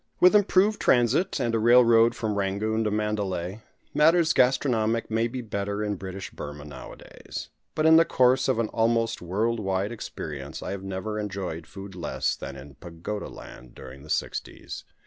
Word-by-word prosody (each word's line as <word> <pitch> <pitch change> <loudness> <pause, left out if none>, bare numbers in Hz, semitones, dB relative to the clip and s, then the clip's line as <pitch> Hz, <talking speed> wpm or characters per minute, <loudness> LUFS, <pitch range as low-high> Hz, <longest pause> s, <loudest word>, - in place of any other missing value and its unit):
With 180 +3 +6
improved 205 +1 +3
transit, 125 - +2
and 120 -3 0
a 115 - +2
railroad 115 0 +5
from 110 -2 -2
Rangoon 105 +3 -1
to - - +2
Mandalay, 105 -2 -2 0.3
matters 165 +1 +4
gastronomic 115 -4 +2
may 115 +1 +1
be 125 +2 -5
better 100 -1 -3
in 105 -1 -1
British 95 0 -7
Burmah 75 0 -8
nowadays; 70 -3 -9 0.3
but 155 - +1
in 160 0 +8
the 165 - +7
course 130 -2 +3
of 130 - +2
an 115 -2 0
almost 115 0 +1
world 110 +7 -1
wide 95 +1 -1
experience 75 -10 -7
I - - -4
have 100 -1 -4
never 95 +3 -4
enjoyed 95 -6 -5
food 95 0 -9
less 90 -2 -2
than - - -7
in 70 0 -12
Pagoda 85 +6 -6
land 60 -1 -12
during 65 +1 -11
the 75 - -14
sixties. - - -4
105 Hz, 165 wpm, -26 LUFS, 95-120 Hz, 0.3 s, in